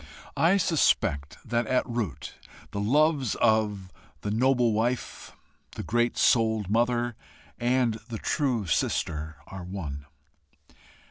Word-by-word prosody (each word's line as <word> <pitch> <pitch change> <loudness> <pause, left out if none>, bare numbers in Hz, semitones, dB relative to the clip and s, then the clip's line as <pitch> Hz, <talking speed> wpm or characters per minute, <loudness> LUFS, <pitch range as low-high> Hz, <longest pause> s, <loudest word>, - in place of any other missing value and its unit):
I 175 +5 +4
suspect 75 - +1
that 120 0 0
at 130 - +1
root 115 - -4 0.4
the 100 - -4
loves 140 +3 +2
of 105 -4 +1 0.3
the 105 - -3
noble 120 0 +3
wife, 120 +4 -2 0.4
the - - -5
great 120 +1 0
souled 110 -4 +2
mother, 120 +1 +1 0.4
and 120 -2 +1
the 115 - -4
true 125 -5 0
sister, 80 -1 -1
are 95 -2 -8
one. 75 -7 -6
115 Hz, 115 wpm, -27 LUFS, 100-125 Hz, 0.4 s, I